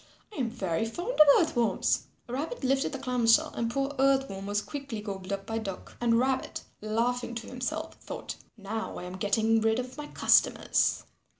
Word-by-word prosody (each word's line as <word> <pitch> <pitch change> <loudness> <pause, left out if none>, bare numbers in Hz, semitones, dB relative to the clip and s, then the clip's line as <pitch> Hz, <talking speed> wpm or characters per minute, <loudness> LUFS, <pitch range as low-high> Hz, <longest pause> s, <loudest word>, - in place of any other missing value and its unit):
I - - -5
am 245 -3 0
very 195 -5 -1
fond 350 - -4
of 305 -7 +7
Earth 320 -4 +1
Worms." 235 -2 +1 0.2
Rabbit 285 - -4
lifted 270 +1 +1
the 275 - -4
clam 250 -3 -1
shell 225 - +5
and 230 -1 -1
poor 275 +3 -1
Earth 270 0 +4
Worm 195 0 -6
was 205 0 +1
quickly 275 -1 -6
gobbled 195 -2 -6
up 195 0 -3
by 225 +1 -2
Duck. 195 -4 -7
And 230 -1 +3
Rabbit, 260 +2 0 0.2
laughing 235 +3 -1
to 230 0 -5
himself, 310 +6 -4
thought, - - -6 0.2
"Now 220 +2 -4
I - - -6
am 180 +1 -6
getting 220 +3 +2
rid 220 0 +2
of 255 +1 -5
my 295 - -5
customers." - - +3
235 Hz, 190 wpm, -29 LUFS, 215-270 Hz, 0.2 s, of